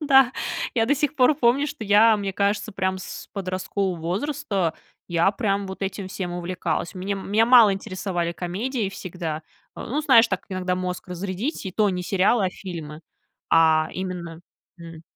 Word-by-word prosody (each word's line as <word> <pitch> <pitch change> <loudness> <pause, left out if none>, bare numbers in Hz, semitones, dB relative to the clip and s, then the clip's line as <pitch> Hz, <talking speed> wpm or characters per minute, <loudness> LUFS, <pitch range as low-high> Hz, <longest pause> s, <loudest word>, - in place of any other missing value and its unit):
да. 270 -4 +5 0.4
Я 225 -2 +3
до 285 - +3
сих 295 +1 -1
пор 260 +3 +5
помню, 270 +2 +2
что 245 - -7
я, 215 +2 +6
мне 195 -1 -3
кажется, 205 +1 0
прямо 190 -1 -1
с - - -8
подросткового 185 -1 -2
возраста, 195 - -1 0.3
я 170 +2 +3
прям 200 -2 -1
вот 190 +1 -7
этим 195 0 -4
всем 185 -2 -4
увлекалась. 175 -1 -3
Мне 190 +2 -3
меня 205 +3 +1
мало 235 -5 +7
интересовали 185 -3 -3
комедии 205 +7 -2
всегда. 170 -4 -5 0.3
Э, - - -7
ну, 290 +7 -1
знаешь, 235 -6 +6
так 190 - -2
иногда 185 -1 -1
мозг 180 0 -4
разрядить, 190 - -4
и 190 - -4
то 210 0 +2
не 180 -2 -2
сериалы, 195 +4 +2
а - - -2
фильмы, 160 -6 -8 0.5
а, 160 -1 +5
именно, 175 -3 -5 0.4
м 165 -1 -10
190 Hz, 165 wpm, -24 LUFS, 180-220 Hz, 0.5 s, мало